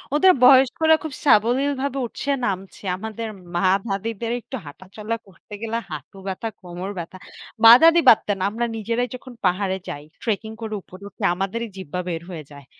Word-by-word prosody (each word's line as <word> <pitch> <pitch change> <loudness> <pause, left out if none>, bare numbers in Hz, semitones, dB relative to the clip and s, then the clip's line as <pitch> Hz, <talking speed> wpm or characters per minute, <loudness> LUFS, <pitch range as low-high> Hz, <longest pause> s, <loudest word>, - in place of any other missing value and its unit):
ওদের 370 +5 +6
বয়স্করা 270 +5 +6
খুব 315 -3 -5
সাবলীলভাবে 270 +3 +2
উঠছে, 260 +4 -6 0.2
নামছে। 195 -1 -4
আমাদের 220 +2 -5 0.3
মা 175 +2 +2 0.2
দাদিদের 225 +3 -3
একটু 265 - -8
হাঁটাচলা 195 +9 -6
করতে 195 +2 -17
গেলে 230 0 -2
হাঁটু 155 +5 -8
ব্যাথা, 190 +4 -3
কোমর 180 +1 -6
ব্যাথা। 170 +2 -7 0.5
মা 225 - +11
দাদি 330 +1 +7
বাদ 220 - +9
দেন, 205 -2 -1
আমরা 230 +3 -2
নিজেরাই 230 +3 -1
যখন 255 0 -11
পাহাড়ে 190 +1 +1
যাই, 145 - -6 0.2
ট্রেকিং 220 -1 -2
করে 220 -1 -5
উপরে 185 +2 -14
উঠে 205 - -11
আমাদেরই 195 +5 -3
জিব্বা 180 -1 -5
বের 165 -2 -3
হয়ে 165 -4 -7
যায়। 140 -1 -13
215 Hz, 165 wpm, -22 LUFS, 185-240 Hz, 0.5 s, মা